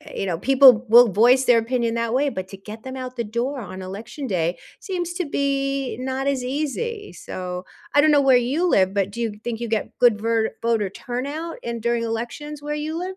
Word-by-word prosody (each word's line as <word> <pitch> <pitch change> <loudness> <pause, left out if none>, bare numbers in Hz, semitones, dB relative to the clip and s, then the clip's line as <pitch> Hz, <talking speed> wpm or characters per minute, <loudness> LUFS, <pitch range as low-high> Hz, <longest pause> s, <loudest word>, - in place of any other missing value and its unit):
eh, - - -13
you - - -1
know, 170 -3 -2
people 255 +1 +6
will 235 -2 +7
voice 245 +6 +5
their 245 -2 +5
opinion 235 0 0
that 230 0 -1
way, 285 +3 +2
but 185 -6 -5
to 195 - -9
get 210 +3 -10
them 260 0 -6
out 255 -1 -6
the 235 - -2
door 245 +5 -3
on 185 -2 -8
election 220 +9 -7
day 175 -5 -1 0.2
seems 355 -5 -3
to 355 -1 -2
be 275 -2 -1
not 265 +1 -3
as 275 -2 0
easy, 410 - -3
so 180 0 -6 0.3
I 290 - +7
don't 310 +1 +4
know 285 -1 +5
where 265 -2 +5
you 275 +9 0
live, 190 - +3
but 200 -1 0
do 235 - -7
you 230 -2 -1
think 235 -1 -4
you 235 - -3
get 220 +3 -3
good 240 -4 +4
ver 225 0 +1
voter 225 -3 +1
turnout 280 - -5
in 235 -1 -4
during 235 +1 0
elections 240 +6 -5
where 295 0 -3
you 310 +2 -3
live? 370 +1 -5
245 Hz, 225 wpm, -22 LUFS, 225-280 Hz, 0.3 s, will